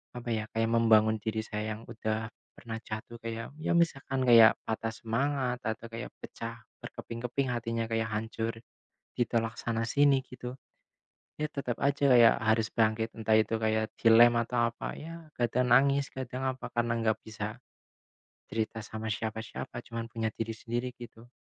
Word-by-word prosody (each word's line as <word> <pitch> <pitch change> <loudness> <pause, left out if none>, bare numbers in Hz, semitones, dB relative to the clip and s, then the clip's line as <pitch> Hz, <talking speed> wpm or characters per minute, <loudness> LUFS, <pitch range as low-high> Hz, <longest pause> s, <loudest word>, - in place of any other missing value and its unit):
apa 120 0 -6
ya, 110 -1 0
kayak 115 0 0
membangun 110 -1 +5
diri 110 0 -1
saya 105 0 -3
yang 110 - -11
udah 110 -1 -2 0.3
pernah 115 -1 -6
jatuh 110 +2 -6
kayak, 115 0 -5
ya, 155 - -1
misalkan 135 -6 +1
kayak 115 -2 +8
patah 110 0 -2
semangat, 125 +3 -1
atau 110 +1 -3
kayak 115 0 -6
pecah - - -7 0.3
berkeping-keping 125 +3 -4
hatinya, 115 -1 -2
kayak 115 0 0
hancur 110 +1 -2 0.6
ditolak 115 -2 0
sana-sini 130 +5 +2
gitu. 125 0 -7 0.9
Ya, 150 - +1
tetep 130 -5 -3
aja 140 +1 +1
kayak 120 -2 +8
harus 110 -1 +2
bangkit, 110 0 +1
entah 110 -1 +1
itu 110 +1 +1
kayak 110 0 +1
dilem 120 +1 +7
atau 120 0 +1
apa - - -5
ya, 165 +1 -9
kadang 125 +1 +1
nangis, 140 +2 +5
kadang 130 0 -5
apa 130 - -8
karena 120 0 +1
nggak 110 -1 +1
bisa 110 0 -5 0.9
cerita 115 0 -2
sama 110 +1 -6
siapa-siapa, 110 +2 -5
cuman 115 -2 -5
punya 115 -1 -2
diri 115 0 -3
sendiri, 120 +2 -3
gitu. 120 -1 -11
115 Hz, 150 wpm, -30 LUFS, 110-125 Hz, 0.9 s, kayak